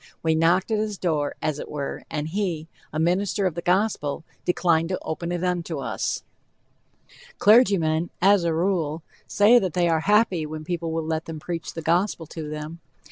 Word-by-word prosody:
We 160 -1 +3
knocked 170 +6 +2
at 215 - +2
his 210 -2 -2
door, 155 -5 -1
as 150 -1 -1
it - - -7
were, 145 -2 -5
and 150 -1 -3
he, 175 -4 -2 0.2
a - - -4
minister 185 +4 +1
of 185 - +1
the 170 - -4
Gospel, 180 -5 0 0.2
declined 170 -2 +2
to 185 - -1
open 170 +2 -4
it 175 0 -2
unto 175 -3 -1
us. 140 - -2 1.1
Clergymen, 185 -8 +4
as 195 0 +5
a 170 - +1
rule, 165 -2 0 0.2
say 220 +4 +5
that 185 -7 -3
they 175 -1 +3
are 165 -1 +2
happy 200 -1 +3
when 155 0 -6
people 170 0 -3
will 160 0 -2
let 160 0 -2
them 160 -1 -6
preach 165 +1 -5
the 165 - -5
gospel 170 +1 +1
to 155 -1 -7
them. 155 +2 -6
170 Hz, 185 wpm, -24 LUFS, 160-185 Hz, 1.1 s, as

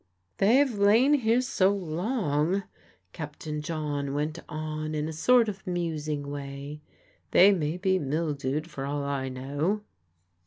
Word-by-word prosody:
"They've 255 +6 +4
lain 215 +7 +4
here 240 -3 +3
so 195 -6 +2
long," 185 - 0 0.5
Captain 150 0 -5
John 150 -3 -3
went 150 +3 -2
on 155 0 -4
in 150 0 -1
a 160 - -5
sort 235 +9 +4
of 195 -1 -6
musing 155 -5 -2
way, 140 +1 -6 0.5
"they 195 +3 +7
may 165 -3 -1
be 190 0 +1
mildewed, 150 0 -2
for 140 -5 -6
all 145 0 -2
I 140 -2 -2
know." 145 +10 -2
155 Hz, 130 wpm, -27 LUFS, 145-195 Hz, 0.5 s, they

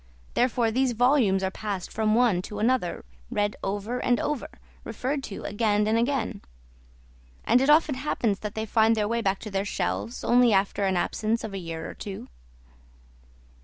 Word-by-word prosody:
Therefore, 240 -2 +2
these 255 +1 +1
volumes 235 -5 +3
are 190 - 0
passed 200 -3 -5
from 215 0 +1
one 230 -7 +3
to 210 +3 -8
another, 220 - 0 0.2
read 205 0 0
over 205 +5 -2
and 245 -1 +1
over, 295 -5 -2 0.3
referred 260 +5 -3
to 200 - -7
again 210 -1 +1
and 215 +1 +1
again; 240 0 0 1.0
and 245 +2 +4
it 270 - +2
often 305 -1 +5
happens 245 -6 -1
that 210 -1 -6
they 220 0 -2
find 225 +1 +3
their 210 -1 0
way 235 +1 0
back 195 -2 +1
to 215 - -7
their 195 0 0
shelves 200 +4 -3
only 245 -2 +4
after 195 +1 +1
an 190 -1 +1
absence 220 +5 -1
of 215 - -5
a 195 - -3
year 165 -2 -6
or - - -7
two." 195 -2 -8
220 Hz, 175 wpm, -26 LUFS, 200-245 Hz, 1.0 s, often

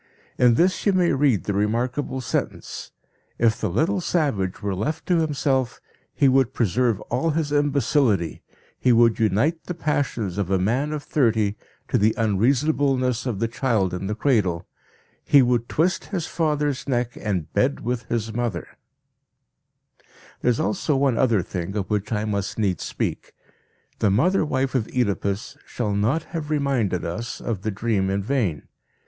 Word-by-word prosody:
In 120 -2 +5
this 185 +7 +2
you 200 - +4
may 180 -2 +3
read 135 -8 +2
the 100 - -2
remarkable 120 +6 -1
sentence: 120 - -4 0.5
"_If 115 0 +2
the 110 - -1
little 165 - +1
savage 135 - 0
were 100 -1 -1
left 145 +12 -3
to 180 - +2
himself 135 -5 0 0.3
he 140 - +3
would 130 -1 +3
preserve 115 0 +1
all 130 +7 -1
his 155 -1 -1
imbecility, 140 - +1 0.4
he 125 - +3
would 115 0 +4
unite 115 - +1
the 180 - -4
passions 120 - -1
of 95 -3 -1
a 95 - +2
man 120 +11 0
of 150 -1 -4
thirty 110 -8 +1 0.3
to - - +1
the 110 +2 +3
unreasonableness 130 +3 +1
of 115 -5 -2
the 115 +3 0
child 115 -6 0
in 90 +2 -3
the 105 - -2
cradle; 105 - +1 0.6
he 140 -2 +6
would 120 -1 +1
twist 175 +4 +1
his 180 -6 -3
father's 150 -4 -1
neck 120 -2 -1
and 90 -7 -2
bed 135 +2 +1
with 125 0 -3
his 115 -1 -2
mother_." 115 -6 -2 1.8
There - - +2
is 120 - +1
also 155 -2 0
one 135 -3 +2
other 115 -8 +3
thing 95 +1 -5
of 100 0 -3
which 105 +1 -1
I 105 -1 0
must 100 -2 -2
needs 100 -6 0
speak. - - -4 0.7
The 105 - +3
mother 160 - +3
wife 135 -3 -1
of 125 -5 0
Oedipus 100 -4 -2
shall 105 -4 -2
not 115 +11 +1
have 160 -3 -4
reminded 135 - 0
us 115 +9 -4
of 110 -5 -3
the 110 - -2
dream 100 -2 0
in 100 0 -1
vain. 105 - -1
120 Hz, 165 wpm, -23 LUFS, 105-140 Hz, 1.8 s, he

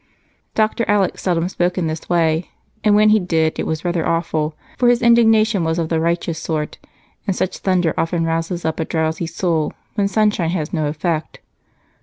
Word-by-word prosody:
Dr. 220 +1 +1
Alec 205 -3 +1
seldom 175 -2 0
spoke 180 -1 -1
in 180 - 0
this 155 0 -4
way, 165 -1 +1 0.3
and 210 -1 +4
when 215 +1 +5
he 215 0 +5
did 165 -4 0
it - - -2
was 160 +2 -3
rather 175 -2 0
awful, 160 -2 -1 0.2
for 245 - +4
his 245 -1 +4
indignation 220 -4 +4
was 160 0 0
of 165 -2 -1
the 165 - +1
righteous 170 0 -1
sort 155 -2 -3 0.5
and 195 - 0
such 185 - -2
thunder 180 -4 +1
often 165 0 0
rouses 165 +2 -2
up 160 - -1
a 160 - 0
drowsy 160 +1 -1
soul 165 -2 -1 0.2
when 200 -2 +1
sunshine 205 -4 +1
has 165 -4 -3
no 155 -3 0
effect. 155 +1 -3
170 Hz, 185 wpm, -19 LUFS, 160-195 Hz, 0.5 s, when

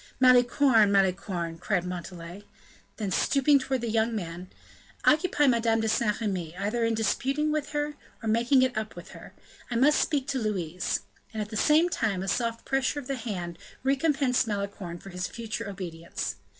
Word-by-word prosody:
"Malicorne! 245 -3 +5
Malicorne!" 185 -4 0
said 180 -4 +1
Montalais. 180 +1 -7 0.5
Then 205 -4 -3
stooping 280 +7 +3
towards 265 -1 -2
the 235 - -1
young 225 +1 +1
man: 175 -2 -5 0.6
"Occupy 305 -1 +4
Madame 230 -3 +3
de 220 - 0
Saint 215 -1 +1
Remy, 180 -6 -3
either 210 +5 -1
in 230 0 +1
disputing 270 +7 0
with 300 -1 -1
her, 295 0 -1 0.3
or - - -3
making 235 +4 +4
it 255 -1 0
up 220 0 -3
with - - -10
her; - - -12 0.3
I 240 - -3
must 280 +6 +4
speak 285 -4 0
to 270 - 0
Louise." 180 -6 -2 0.3
And, 220 - -4
at 210 0 -3
the 220 - -7
same 305 +9 +4
time, 205 - -1
a - - -5
soft 230 +2 -1
pressure 270 +1 0
of 280 - -9
the 275 +1 -2
hand 185 -8 -5 0.2
recompensed 270 -2 +2
Malicorne 200 -4 -4
for 195 +3 -11
his 180 +1 -3
future 225 -3 -5
obedience. 170 -4 -5
225 Hz, 175 wpm, -27 LUFS, 190-265 Hz, 0.6 s, Malicorne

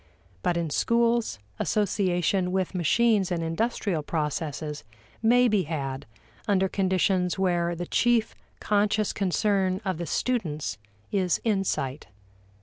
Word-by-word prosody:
But 175 - 0
in 165 -3 -2
schools, 235 - +1 0.2
association 185 -3 +1
with 190 0 -1
machines 195 +3 +2
and 170 -2 -1
industrial 175 0 -1
processes 150 -2 -3 0.4
may 245 +2 +5
be 210 -4 +2
had 135 -5 -4 0.4
under 190 -2 +3
conditions 185 -1 +1
where 175 -2 +1
the 175 +1 -4
chief 240 +3 +2 0.3
conscious 210 0 +1
concern 190 -1 +1
of 185 -4 -2
the 170 - -4
students 155 - -2 0.3
is 185 -4 +1
insight. 195 - -1
185 Hz, 115 wpm, -26 LUFS, 165-210 Hz, 0.4 s, may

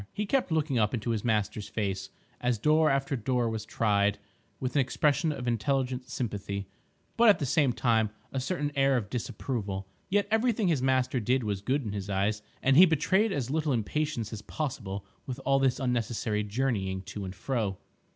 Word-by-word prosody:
He 210 - -2
kept 255 -3 +1
looking 155 -5 +1
up 105 +3 +2
into 115 +1 -2
his 110 -3 -1
master's 105 -2 0
face, 100 -3 -3 0.3
as 125 -1 +1
door 155 +7 +4
after 135 0 +1
door 125 0 0
was 110 -1 -3
tried, 105 -2 +1 0.4
with 130 -1 -2
an - - +4
expression 150 +4 +1
of 125 -4 -5
intelligent 125 +2 0
sympathy, 100 -6 -3 0.5
but 235 -1 +7
at 205 - +6
the 145 - -2
same 140 0 +3
time 115 -3 +2 0.2
a 135 - -2
certain 145 +1 -2
air 135 -1 +3
of 105 -4 -4
disapproval. 105 -5 -3 0.2
Yet 205 +1 +2
everything 220 -3 +2
his 150 -6 +1
master 130 -1 +2
did 125 +3 +1
was 100 -3 -2
good 135 +6 0
in 105 - -4
his 100 -1 -5
eyes, 100 +2 0 0.2
and 135 +1 +4
he 185 +2 +10
betrayed 190 +7 +2
as 135 -7 -2
little 155 -1 0
impatience 120 0 -1
as 110 - -6
possible 105 -8 -4 0.2
with 130 0 -4
all 135 +1 +4
this 135 -2 +2
unnecessary 115 -4 -1
journeying 100 -4 -1
to 100 +2 -6
and 95 0 -6
fro. 105 -3 -2
125 Hz, 185 wpm, -29 LUFS, 105-140 Hz, 0.5 s, he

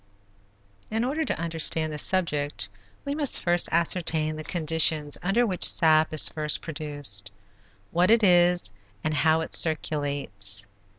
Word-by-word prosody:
In 220 +1 -2
order 290 +6 -2
to - - -3
understand 160 -1 +1
this 150 - -2
subject 150 - 0 0.4
we 280 - -3
must 290 -2 +4
first 175 0 +1
ascertain 165 -2 0
the 155 - -7
conditions 155 -2 +1
under 205 +7 +1
which 185 -5 -2
sap 155 -1 +3
is 155 - +2
first 150 -1 +1
produced, 145 - -4 0.6
what 175 +3 +2
it 230 0 +4
is, 175 - +3 0.3
and 155 - -1
how 160 +1 +2
it 160 - -6
circulates. 140 - -2
160 Hz, 135 wpm, -25 LUFS, 150-175 Hz, 0.6 s, must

